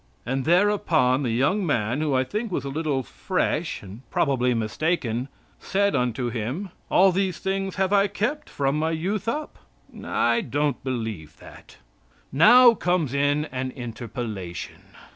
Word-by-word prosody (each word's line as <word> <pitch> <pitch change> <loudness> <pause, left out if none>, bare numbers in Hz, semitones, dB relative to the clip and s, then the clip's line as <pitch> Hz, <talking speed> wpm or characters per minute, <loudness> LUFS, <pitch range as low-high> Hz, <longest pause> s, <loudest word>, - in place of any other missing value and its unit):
And 135 +1 -2
thereupon 170 -7 +3
the 130 - -1
young 140 - +1
man, 125 - 0
who 150 -3 0
I 130 - +3
think 210 - -4
was 140 -6 -2
a - - -3
little 145 -2 -1
"fresh," - - -2
and 100 +4 -10
probably 125 -4 +1
mistaken, 120 +1 -1 0.3
said 200 -2 0
unto 125 -1 -1
Him: 125 - -4 0.2
"All 190 +1 +5
these 190 0 -1
things 195 0 -2
have 190 0 0
I 200 0 +4
kept 215 +9 -3
from 140 +1 0
my 160 +1 0
youth 190 +6 -2
up." 300 +6 -3 0.4
I 115 0 +1
don't 145 +1 -1
believe 110 - -4
that. - - -15 0.5
Now 240 - +7
comes 175 - 0
in 145 +2 +1
an 130 0 -3
interpolation. 115 - -6
145 Hz, 145 wpm, -24 LUFS, 125-190 Hz, 0.5 s, Now